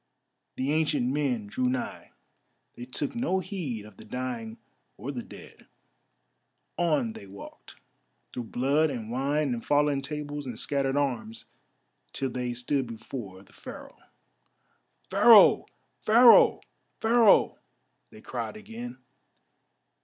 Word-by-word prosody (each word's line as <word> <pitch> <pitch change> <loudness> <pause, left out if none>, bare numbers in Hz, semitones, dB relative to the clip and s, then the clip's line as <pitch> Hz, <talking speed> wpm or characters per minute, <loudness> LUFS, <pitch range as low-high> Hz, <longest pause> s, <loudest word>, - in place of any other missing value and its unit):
The 135 +2 -1
ancient 150 -5 +1
men 135 -7 -1
drew 125 +5 -1
nigh. 130 0 -4 0.7
They 120 - -8
took 135 +3 -4
no 235 -5 0
heed 170 - -5
of 105 - -15
the - - -12
dying 120 -3 -5 0.4
or 125 +8 -5
the 125 -4 -5
dead: - - -14 1.1
on 150 -10 0
they 100 - -11
walked, 100 +1 -12 0.6
through 125 - -5
blood 140 +7 +1
and 115 -5 -6
wine 140 +2 0
and 115 - -5
fallen 145 -1 +2
tables 145 0 -5
and 120 -3 -6
scattered 140 -1 -1
arms, 115 -6 -2 0.7
till 135 -2 -3
they 125 -1 -3
stood 130 +2 -1
before 110 -4 -8
the - - -23
Pharaoh. - - -11 1.1
"Pharaoh! - - +7 0.3
Pharaoh! 235 +2 +6 0.4
Pharaoh!" 225 -2 +4 0.5
they - - -15
cried - - -5
again. 230 +3 -8
135 Hz, 120 wpm, -27 LUFS, 120-150 Hz, 1.1 s, Pharaoh